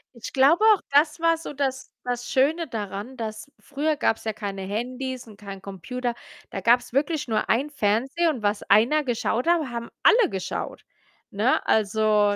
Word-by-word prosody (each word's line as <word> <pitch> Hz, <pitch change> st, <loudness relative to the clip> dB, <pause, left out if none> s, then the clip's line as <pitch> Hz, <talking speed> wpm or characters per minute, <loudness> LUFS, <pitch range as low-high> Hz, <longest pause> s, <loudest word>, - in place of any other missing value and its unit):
Ich 235 Hz, -, -8 dB
glaube 290 Hz, +10 st, +4 dB
auch, 395 Hz, -, -1 dB
das 300 Hz, +3 st, +3 dB
war 330 Hz, 0 st, +3 dB
so 320 Hz, -, -8 dB
das 265 Hz, -1 st, -3 dB
das 245 Hz, 0 st, -3 dB
Schöne 310 Hz, +5 st, +2 dB
daran, 210 Hz, +3 st, -5 dB
dass 220 Hz, +4 st, -6 dB
früher 295 Hz, +2 st, -2 dB
gab's 225 Hz, -, 0 dB
ja 220 Hz, -, -1 dB
keine 200 Hz, -2 st, -5 dB
Handys 250 Hz, +5 st, -4 dB
und 210 Hz, -2 st, -14 dB
keinen 195 Hz, -2 st, -9 dB
Computer, 240 Hz, +6 st, -4 dB, 0.4 s
da 195 Hz, -, -4 dB
gab's 240 Hz, +3 st, +3 dB
wirklich 295 Hz, +1 st, 0 dB
nur 215 Hz, -2 st, -1 dB
einen 270 Hz, +6 st, +2 dB
Fernseher 270 Hz, +7 st, +1 dB
und 255 Hz, -8 st, -3 dB
was 205 Hz, 0 st, 0 dB
einer 240 Hz, +10 st, +4 dB
geschaut 245 Hz, -1 st, -1 dB
hat, 340 Hz, 0 st, +4 dB
haben 235 Hz, 0 st, -5 dB
alle 455 Hz, -5 st, +5 dB
geschaut, 190 Hz, -1 st, -5 dB, 0.5 s
ne? 215 Hz, +6 st, +1 dB
Also 210 Hz, -1 st, +3 dB
245 Hz, 170 wpm, -25 LUFS, 215-285 Hz, 0.5 s, alle